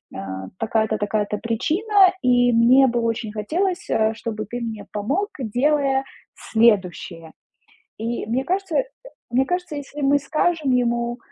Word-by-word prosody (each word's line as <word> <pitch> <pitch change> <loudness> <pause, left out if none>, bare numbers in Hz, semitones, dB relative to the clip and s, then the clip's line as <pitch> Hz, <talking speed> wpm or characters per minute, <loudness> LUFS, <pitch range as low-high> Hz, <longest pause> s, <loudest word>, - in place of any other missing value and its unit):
а, 95 0 -6
такая-то, 220 -1 0
такая-то 210 0 -1
причина. 375 - +2
И 245 -1 +3
мне 250 +4 +6
бы 240 -1 0
очень 230 -2 -2
хотелось, 350 - -2
а, 220 0 +2
чтобы 220 -1 -5
ты 240 +4 -6
мне 225 -3 -5
помог, 285 - -1
делая 270 +3 +1 0.3
следующее". 185 -7 0 0.7
И 230 +2 -3
мне 245 +4 0
кажется 375 +1 0 0.5
мне 260 +2 +2
кажется, 360 -3 -2
если 285 +1 -7
мы 280 +1 +3
скажем 310 +1 0
ему, 240 -1 0
240 Hz, 135 wpm, -22 LUFS, 220-290 Hz, 0.7 s, мне